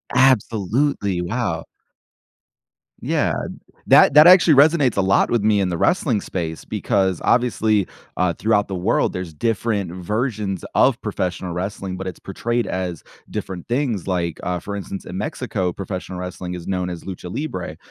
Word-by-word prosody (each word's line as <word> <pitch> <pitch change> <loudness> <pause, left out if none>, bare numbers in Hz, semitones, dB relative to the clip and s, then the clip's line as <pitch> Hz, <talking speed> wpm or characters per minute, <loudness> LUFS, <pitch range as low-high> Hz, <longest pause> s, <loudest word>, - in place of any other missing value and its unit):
Absolutely, 115 -4 +2
wow. 90 -3 -2 1.4
Yeah. - - 0 0.5
That - - +6
that 150 +2 +9
actually 175 -3 +8
resonates 145 -3 +4
a - - +3
lot 95 0 +3
with 120 -3 +1
me 105 -1 +3
in 95 - +1
the 85 - -2
wrestling 130 - +2
space 80 -5 -5
because, 95 -3 0
obviously, 110 -5 +2 0.3
uh, 90 -1 +2
throughout 105 +2 +1
the 95 - -4
world, 95 +6 +1
there's 90 -3 -6
different 105 -1 -1
versions 105 +1 -2
of - - +4
professional 90 0 -3
wrestling, 95 +1 -4
but 95 +1 -6
it's 95 - -6
portrayed 120 +5 -2
as 90 -2 -3 0.3
different 90 -3 -6
things, 120 - -1
like, 85 -3 -1
uh, 90 0 -2
for 100 +4 -5
instance, 100 0 -6
in 90 - -6
Mexico, 100 -4 -2
professional 95 -1 -6
wrestling 90 0 -5
is 90 -1 -8
known 90 -1 -1
as 85 -2 -6
lucha 90 -1 -7
libre, 140 - -4
95 Hz, 155 wpm, -21 LUFS, 90-115 Hz, 1.4 s, that